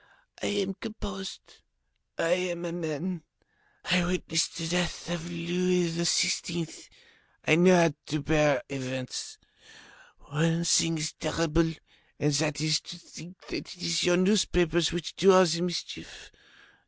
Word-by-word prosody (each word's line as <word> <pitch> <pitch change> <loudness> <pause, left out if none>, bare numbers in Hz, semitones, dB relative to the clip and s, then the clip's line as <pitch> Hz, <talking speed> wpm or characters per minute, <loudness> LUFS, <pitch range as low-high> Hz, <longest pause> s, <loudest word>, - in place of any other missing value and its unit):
I - - -1
am 200 -1 -1
composed, 195 -3 -8 0.6
I 165 - 0 0.2
am 175 0 -4
a 170 - -3
man, 170 +1 -4 0.6
I 180 0 +3
witnessed 175 -2 -1
the 165 -1 -3
death 175 -1 -1
of 175 0 -4
Louis 175 +1 0
XVI., 170 0 0 0.6
I - - +5
know 180 +2 +7
how 165 -3 +4
to 155 0 -2
bear 150 -1 +3
events. 130 -2 -5 0.8
One 165 +3 0
thing 165 -1 +3
is 155 0 -3
terrible 165 0 0 0.5
and 150 0 +1
that 150 0 0
is 155 -1 +2
to 175 - -10
think 175 +1 -13
that - - -6
it - - -22
is 170 -2 0
your 175 0 +4
newspapers 180 -4 +2
which 175 -2 -5
do 190 +2 +6
all 185 0 +7
the 170 0 0
mischief. 175 -2 -5
170 Hz, 140 wpm, -28 LUFS, 160-180 Hz, 0.8 s, know